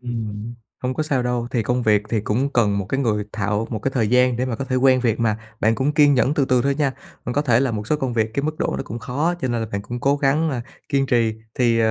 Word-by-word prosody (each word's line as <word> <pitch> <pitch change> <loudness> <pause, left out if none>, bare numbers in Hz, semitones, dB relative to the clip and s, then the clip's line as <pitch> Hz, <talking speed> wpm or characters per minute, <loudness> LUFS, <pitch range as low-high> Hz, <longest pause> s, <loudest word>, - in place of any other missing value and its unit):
Ừm, 115 -2 -5 0.3
hông 130 0 -1
có 155 - -1
sao 135 -5 0
đâu. 120 -1 -1
Thì 120 -3 0
công 125 +3 0
việc 105 -2 +3
thì 110 - 0
cũng 130 +7 -1
cần 105 -4 +2
một 95 - -3
cái 135 +5 -1
người 105 -5 0
thạo 105 +1 -1
một 110 - -2
cái 135 - -1
thời 115 -5 +1
gian 125 0 +3
để 125 - 0
mà 115 -3 -2
có 135 - -3
thể 130 -1 -1
quen 130 0 +4
việc 115 -2 0
mà, 110 -2 +1 0.2
bạn 110 +1 +3
cũng 140 +4 0
kiên 145 -2 +5
nhẫn 135 +3 +2
từ 140 - +2
từ 125 -2 +2
thôi 140 0 +1
nha. 140 -2 0 0.3
Mình 125 - -3
có 145 +3 +1
thể 120 -3 +3
làm 130 -5 0
một 105 0 -5
số 150 - +1
công 130 -4 -2
việc 110 -1 0
cái 140 - 0
mức 155 +1 -3
độ - - -1
nó - - -3
cũng 115 +3 -6
khó, 150 +9 -1
cho 130 - -1
nên 120 -1 -1
là 110 - -2
bạn 100 - -2
cũng 120 +4 -6
cố 140 +2 +2
gắng, 150 +3 +1
a, 125 -4 -3 0.3
kiên 135 -2 +1
trì 115 -3 +2 0.2
thì, 120 -2 +2
ờ, 110 -1 +3
125 Hz, 305 wpm, -22 LUFS, 110-135 Hz, 0.3 s, kiên